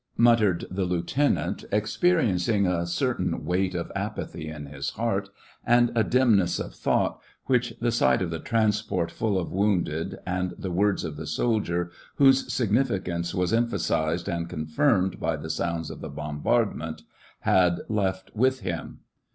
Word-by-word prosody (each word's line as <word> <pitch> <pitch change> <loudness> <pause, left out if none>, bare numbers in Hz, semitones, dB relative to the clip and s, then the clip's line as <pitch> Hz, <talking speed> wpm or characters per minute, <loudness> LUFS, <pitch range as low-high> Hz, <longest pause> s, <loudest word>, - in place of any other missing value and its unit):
muttered 115 -6 +4
the 95 +1 -1
lieutenant, 90 +11 0
ex 105 +1 0
periencing 105 - +2
a 85 -1 0
certain 85 - -1
weight 90 +1 0
of 85 -1 -3
apathy 80 - -4
in 75 -2 -7
his 70 -1 -4
heart, 100 -3 -1 0.3
and 120 0 +4
a 115 - +3
dimness 110 -9 +3
of - - -5
thought, - - 0 0.2
which 125 -2 +1
the 120 0 +1
sight 65 - +3
of 90 -3 -2
the 80 - -3
transport 105 -5 0
full 110 -4 0
of 90 - -3
wounded 90 -5 0
and 90 0 -2
the 95 - -4
words 100 +3 +1
of 75 -2 -5
the 80 - -6
soldier, 90 -7 0 0.2
whose 135 -1 +4
significance 100 -8 0
was 90 +2 0
emphasized 85 -8 0
and 85 -3 -2
confirmed 90 - +1
by 80 0 0
the 80 +2 -5
sounds 80 0 -2
of - - -9
the - - -6
bombardment, 80 +1 -1 0.4
had 90 -2 +3
left 95 -3 -1
with 130 +3 +2
him. 85 -2 -5
95 Hz, 150 wpm, -26 LUFS, 85-115 Hz, 0.4 s, muttered